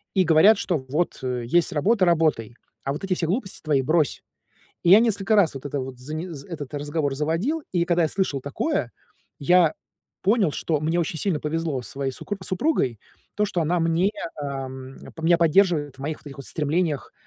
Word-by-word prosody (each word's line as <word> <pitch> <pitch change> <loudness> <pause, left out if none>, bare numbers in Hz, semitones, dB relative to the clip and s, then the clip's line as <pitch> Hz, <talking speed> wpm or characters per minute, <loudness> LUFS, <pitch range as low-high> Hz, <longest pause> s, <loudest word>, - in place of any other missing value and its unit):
И 190 - +5
говорят, 170 +7 +6
что 175 -4 0
вот, 160 +6 -1
э, 125 -1 -2
есть 170 +7 +2
работа- 195 +6 +3
работай, 155 -10 +1 0.3
а 135 - -1
вот 150 - -7
эти 190 -1 0
все 170 - -1
глупости 190 +2 -3
твои 150 -3 +2
брось. 155 +1 +1 0.6
И 170 - +4
я 200 +4 +9
несколько 215 -2 +2
раз 180 -8 +4
вот 135 - -8
это 145 0 -3
вот 130 -1 -7
зане 155 +7 -5 0.2
этот 150 -4 -7
разговор 145 -1 -2
заводил, 165 - -1
и 175 -2 +2
когда 175 -1 +2
я 160 - +2
слышал 170 -6 -1
такое, 145 - -2 0.5
я 170 +2 +4 0.5
понял, 200 -3 +3
что 155 0 -1
мне 160 +3 0
очень 165 -1 -3
сильно 185 -7 0
повезло 155 -3 -2
со - - -11
своей 135 -1 -2
сукру 205 +10 -5
супругой, 185 - 0 0.4
то, 210 - +2
что 190 -4 -2
она 175 +3 +1
мне, 165 +4 +2 0.3
ам, 135 -1 -6 0.3
меня 170 +1 +4
поддерживает 165 -4 +3
в - - -14
моих 150 +3 -3
вот - - -24
этих 140 -1 -9
вот 140 - -7
стремлениях, 150 - -1
160 Hz, 190 wpm, -24 LUFS, 140-180 Hz, 0.6 s, я